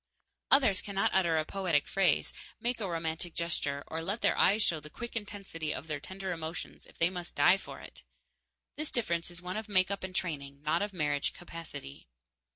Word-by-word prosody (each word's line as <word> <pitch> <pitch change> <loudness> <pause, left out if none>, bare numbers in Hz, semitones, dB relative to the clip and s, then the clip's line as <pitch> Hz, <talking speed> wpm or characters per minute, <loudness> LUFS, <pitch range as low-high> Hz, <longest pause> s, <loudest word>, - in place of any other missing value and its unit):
Others 245 -9 +6
cannot 195 -1 0
utter 170 -4 +4
a 155 - +1
poetic 175 -6 +1
phrase, 190 -5 +3 0.3
make 240 +1 -1
a 200 -4 -2
romantic 165 0 -2
gesture, 145 -4 -1
or 160 +1 -3
let 200 +7 -2
their - - +4
eyes 210 +3 +5
show 165 -5 +2
the 150 0 -10
quick 235 +10 -7
intensity 195 -7 -4
of - - -4
their 150 -2 -2
tender 190 +4 -5
emotions 165 -1 -5
if - - -18
they 165 +2 +3
must 175 -2 -6
die 145 +7 +6
for - - -9
it. - - -11 0.8
This 305 0 -1
difference 170 -9 0
is 175 0 -6
one 180 +3 -3
of 215 0 -5
make 185 -1 +3
up 200 - -2
and 185 -1 -5
training, 140 -5 -3
not 155 +3 +2
of 205 0 -1
marriage 145 -5 0
capacity. 165 - -9
175 Hz, 195 wpm, -32 LUFS, 160-195 Hz, 0.8 s, Others